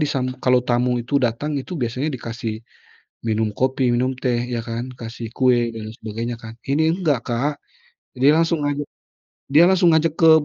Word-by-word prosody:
disam 130 -4 -1
kalau 125 -1 +3
tamu 125 0 +1
itu 135 +5 -1
datang 135 +4 -1
itu 175 +7 -6
biasanya 125 +4 -1
dikasih 115 -3 -5 0.7
minum 110 -1 +1
kopi, 130 0 +1
minum 130 +2 +1
teh, 120 -2 0
ya 120 -1 -1
kan, 120 +2 -4
kasih 115 0 -7
kue 120 -2 +3
dan 110 -1 -6
sebagainya 115 +2 -4
kan. 115 0 -9
Ini 155 +4 +2
enggak 150 -8 +2
Kak, 130 +5 0 0.6
dia 135 +4 +5
langsung 165 -2 +1
ajak, 145 0 -2 0.7
dia 155 +4 +7
langsung 180 -2 +4
ngajak 160 0 +2
ke 165 -1 +7
125 Hz, 165 wpm, -21 LUFS, 115-145 Hz, 0.7 s, dia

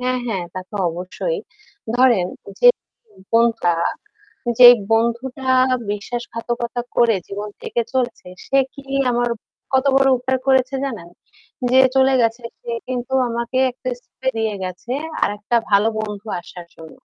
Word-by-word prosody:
হ্যাঁ, 255 0 0
হ্যাঁ, 195 -7 -2
তা 185 - -3
তো 210 - -6
অবশ্যই। 185 - -4 0.6
ধরেন 240 -8 +4 0.3
যে - - +7 0.6
বন্ধুটা 230 -7 +3 0.9
যেই 245 -1 +12 0.2
বন্ধুটা 235 +4 0 0.4
বিশ্বাসঘাতকতা 235 +3 -4
করে 235 -2 +4
জীবন 205 +1 -5
থেকে 240 - -1
চলছে 250 -6 -2 0.2
সে 275 - +1 0.2
কি 275 - -11 0.3
আমার 240 0 +1 0.4
কত 265 +1 +3
বড় 270 0 +5
উপকার 260 +1 -1
করেছে 265 0 +3
জানেন? 225 -11 -6 0.6
যে 260 - +6 0.2
চলে 265 0 +4
গেছে 230 +1 0 0.2
সে 235 - -7 0.2
কিন্তু 250 0 -4 0.2
আমাকে 235 +2 -3
একটা 255 +1 -6
স্থানে 260 +1 -4
নিয়ে 220 -2 -1
গেছে 185 +7 -5 0.3
আরেকটা 205 +3 -1 0.2
ভালো 200 +2 +5
বন্ধু 210 0 -5
আসার 175 0 -11
জন্য। 160 -1 -12
235 Hz, 135 wpm, -20 LUFS, 210-255 Hz, 0.9 s, যেই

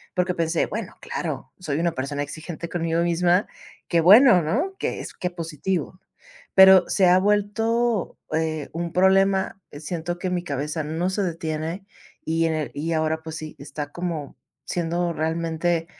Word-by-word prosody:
porque 180 0 +1
pensé: 165 -1 0
"Bueno, - - -5
claro, - - -5
soy 155 -4 -2
una 170 0 +1
persona 140 +2 -3
exigente 160 +3 -7
conmigo 165 -1 0
misma. 175 +2 +2 0.4
Qué 170 -1 +3
bueno, 210 +2 +8
¿no? 270 - -1
Que - - -2
es - - -8
que 180 - -3
positivo", 175 +1 -4 0.6
pero 190 -1 +8
se 190 -2 +3
ha 180 +1 +6
vuelto, 210 +2 0 0.2
eh, 160 -2 -1
un 170 +1 -4
problema. 190 +1 +3
Siento 165 +3 -4
que 185 - -3
mi 180 -1 -2
cabeza 150 +1 -3
no 165 +4 -1
se 200 +2 -1
detiene 165 +1 -3 0.4
y 165 +1 +1
en 160 - 0
el 155 -2 -2
y 160 +3 -2
ahora 160 0 0
pues 160 0 -7
sí, 155 -1 -8
está 145 +1 -7
como 170 -5 -4 0.3
siendo 170 +1 -1
realmente 165 +1 -1
170 Hz, 160 wpm, -24 LUFS, 160-185 Hz, 0.6 s, bueno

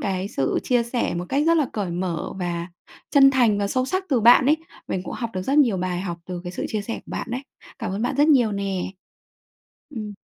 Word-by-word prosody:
cái 190 0 -2
sự 135 - 0
chia 245 -2 +2
sẻ 235 -3 -2
một 175 +1 -3
cách 280 +2 +1
rất 335 0 +5
là 300 - +2
cởi 200 -5 -2
mở 175 -2 -3
và 170 -2 -2 0.4
chân 275 -2 +7
thành 240 -6 +3
và 200 - 0
sâu 255 +4 0
sắc 375 +6 -1
từ 260 -6 +2
bạn 240 +3 +7
ấy. 305 +2 +5 0.3
Mình 185 - -1
cũng - - -5
học 230 -2 -4
được 185 - -2
rất 275 +8 +1
nhiều 235 -9 +4
bài 180 -1 -2
học 175 -3 -4
từ 180 -1 -5
cái 175 - -5
sự - - -4
chia 215 -2 -2
sẻ 230 - -4
của - - -10
bạn - - -4
đấy. 250 +2 -2 0.4
Cảm 225 -6 -3
ơn 205 - -2
bạn 255 +3 -1
rất 290 +2 +4
nhiều 245 -7 +4
nè! 195 -2 -2 1.0
Ừm. 215 -3 -5
215 Hz, 245 wpm, -23 LUFS, 185-260 Hz, 1.0 s, chân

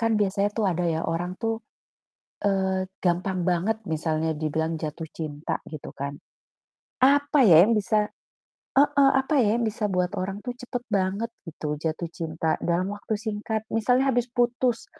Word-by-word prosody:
kan 230 -1 +2
biasanya 200 +1 +1
tuh 215 -2 0
ada 180 -1 0
ya 165 -2 0
orang 175 +2 -2
tuh, 225 -1 -2 0.8
eee, 190 -1 +1 0.2
gampang 180 +1 0
banget 185 +5 0
misalnya 160 0 0
dibilang 160 +1 -1
jatuh 160 +1 -5
cinta, 150 -2 -4
gitu, 155 -3 -8
kan. 140 +1 -5 0.8
Apa, 285 0 +5
ya, 165 -2 +9
yang 220 - +4
bisa 210 +1 +1 0.7
heeh, 280 -1 +5
apa, 285 +3 -2
ya, 215 +2 +2
yang 235 - 0
bisa 210 -1 -1
buat 180 0 0
orang 195 +1 -3
tuh 245 - -2
cepat 245 0 -5
banget 200 +2 0 0.2
gitu 150 -2 -4
jatuh 160 +1 -2
cinta 160 -1 -1
dalam 180 +4 0
waktu 205 +1 -3
singkat? 220 0 -3
Misalnya 250 +4 +3
habis 245 0 0
putus, 245 -1 +1
195 Hz, 155 wpm, -26 LUFS, 165-225 Hz, 0.8 s, ya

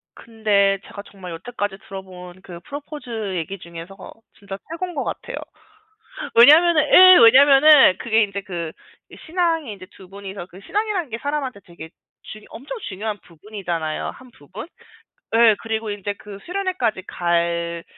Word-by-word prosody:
근데 205 -3 0 0.2
제가 200 - -7
정말 190 -3 -10
여태까지 205 +2 -5
들어 195 -1 -7
본 180 -1 -12 0.2
그 175 -2 -10
프러포즈 250 -9 -7
얘기 175 +3 -4
중에서 170 +3 -11 0.3
진짜 195 -1 -8
최곤 350 +2 -5
것 280 - -2
같아요. - - -6 1.0
왜냐하면은 310 +7 +7
예 370 0 +9
왜냐하면은 270 - +7
그게 225 -1 +2
인제 200 -1 -4
그 170 -4 -6 0.5
신앙이 330 -6 -1
인제 190 -2 -12
두 185 -2 -15
분이서 195 -2 -9
그 185 +1 -15
신앙이라는 410 -7 -2
게 230 - -5
사람한테 280 -5 -4
되게 170 -2 -12 0.3
중 215 - -11
엄청 280 - -9
중요한 210 +2 -5
부분이잖아요 170 -3 -5
한 255 -1 -16
부분. 190 - -11 0.7
예 225 -2 +5
그리고 220 -1 -3
인제 205 0 -4
그 205 -2 -11
수련회까지 360 - -2
갈 170 -1 -2
210 Hz, 325 characters per minute, -21 LUFS, 185-280 Hz, 1.0 s, 예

